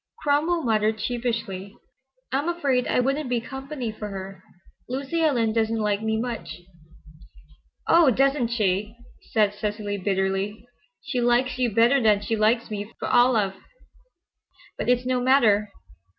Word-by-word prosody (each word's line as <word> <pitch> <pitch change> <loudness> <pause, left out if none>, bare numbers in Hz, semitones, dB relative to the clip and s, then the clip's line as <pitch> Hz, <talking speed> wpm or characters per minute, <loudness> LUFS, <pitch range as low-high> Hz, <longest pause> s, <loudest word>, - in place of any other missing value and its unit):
Cromwell 310 +4 +1
muttered 220 -2 +1
sheepishly, 230 -4 -3 0.5
"I'm 285 +5 0
afraid 280 -8 0
I - - +1
wouldn't 275 +2 0
be 245 -1 +1
company 265 0 -6
for 215 0 -7
her. 190 -1 -8 0.5
Lucy 275 +6 -2
Ellen 240 -8 +2
doesn't 225 0 0
like 210 -1 0
me 220 0 -1
much—" 230 -6 -5 1.2
"Oh, 335 -4 +5
doesn't 270 0 +2
she!" 210 -2 -1 0.4
said 210 -2 +2
Cecily, 205 -1 -3
bitterly. 195 +3 -1 0.4
"She 255 -3 -2
likes 245 +1 +1
you 250 -1 +2
better 235 +5 +4
than 210 -3 +3
she 215 +2 -1
likes 220 +2 +1
me 205 +1 -5
for - - -4
all 245 0 +4
I've—but - - -7
it's 250 0 +2
no 255 -1 0
matter. 220 -6 +3
230 Hz, 135 wpm, -24 LUFS, 210-260 Hz, 1.2 s, Oh